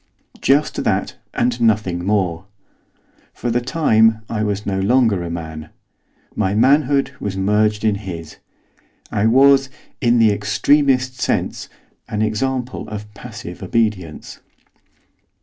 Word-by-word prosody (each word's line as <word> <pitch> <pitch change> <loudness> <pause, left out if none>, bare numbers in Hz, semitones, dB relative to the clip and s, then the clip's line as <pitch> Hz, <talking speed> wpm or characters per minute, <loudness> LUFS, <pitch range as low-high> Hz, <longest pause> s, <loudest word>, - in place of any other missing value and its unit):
Just 145 +3 +2
that, - - -1 0.2
and 120 0 0
nothing 105 -6 +1
more. 95 -3 0 0.9
For 120 - -3
the 120 +1 +1
time 115 -6 +3
I 110 -2 -1
was 105 -1 -2
no 95 -1 -1
longer 110 -2 +2
a 85 - -5
man; 80 -2 -6 0.7
my 95 +2 0
manhood 140 +3 +3
was 100 -2 -4
merged 105 +2 +1
in 110 - +3
his. 85 -5 -8 0.7
I 105 +2 +1
was, 135 +2 +5 0.3
in 120 -2 +3
the 110 -2 +5
extremest 130 +5 +1
sense, - - -1 0.4
an 105 0 -1
example 125 +3 -2
of 105 0 -8
passive 100 - -9
obedience. 105 -9 -2
110 Hz, 120 wpm, -19 LUFS, 100-125 Hz, 0.9 s, was